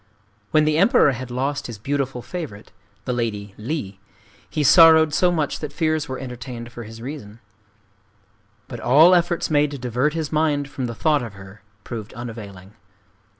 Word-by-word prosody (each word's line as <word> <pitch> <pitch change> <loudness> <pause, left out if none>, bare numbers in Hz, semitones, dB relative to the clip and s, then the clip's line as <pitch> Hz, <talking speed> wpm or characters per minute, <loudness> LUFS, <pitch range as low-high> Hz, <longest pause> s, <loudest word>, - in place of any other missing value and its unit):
When 155 -1 +3
the 155 +1 +2
Emperor 200 - +5
had 130 0 -6
lost 135 +4 -2
his 115 -3 -7
beautiful 135 +2 -3
favorite, 150 - -7 0.3
the 125 - -1
Lady 105 -4 -3
Li, 105 -6 -4 0.5
he 150 - -1
sorrowed 160 +1 +7
so 180 +3 +3
much 155 -4 -1
that 150 -2 -5
fears 155 -1 -1
were 130 - -4
entertained 125 -2 -8
for 120 -1 -8
his 115 +1 -11
reason. 120 -6 -8 1.3
But 120 - -7
all 150 +10 +6
efforts 175 -2 +1
made 150 0 +3
to 140 - -6
divert 125 +4 -1
his 160 -3 -3
mind 150 -2 +1
from 130 -2 -4
the 115 - -6
thought 150 +2 +2
of 115 -4 -7
her 95 +1 -13 0.2
proved 110 -3 -7
unavailing. 105 -5 -9
130 Hz, 165 wpm, -22 LUFS, 115-155 Hz, 1.3 s, sorrowed